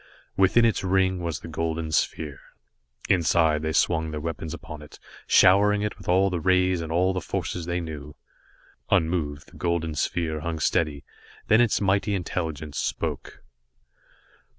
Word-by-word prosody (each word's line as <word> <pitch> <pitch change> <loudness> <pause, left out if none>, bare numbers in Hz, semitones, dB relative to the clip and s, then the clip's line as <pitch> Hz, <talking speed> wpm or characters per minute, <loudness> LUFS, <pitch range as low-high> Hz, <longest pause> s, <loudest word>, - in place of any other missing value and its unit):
Within 95 +5 +4
its 115 -3 +1
ring 95 -1 +2
was 85 -3 -3
the - - -8
golden 80 0 -3
sphere. 75 -1 -1 0.7
Instantly, 85 -4 +3
they 80 +1 -2
swung 80 +1 +1
their 75 -1 -4
weapons 80 0 -5
upon 75 -2 -8
it, 75 - -13 0.3
showering 105 +2 +5
it 105 - -2
with - - -9
all 95 +2 +3
the 90 - -1
rays 90 +1 +2
and 80 -1 -5
all 90 +3 +2
the 90 - -2
forces 85 0 -4
they 85 0 -1
knew. 75 -3 -8 0.7
Unmoved, 80 -3 0
the - - -15
golden 85 -2 -1
sphere 80 +1 -1
hung 80 +1 -3
steady, 75 -2 0 0.5
then 110 +2 +6
its 120 -3 +2
mighty 100 +1 +1
intelligence 80 -5 -4
spoke. - - -4
85 Hz, 150 wpm, -25 LUFS, 80-95 Hz, 0.7 s, then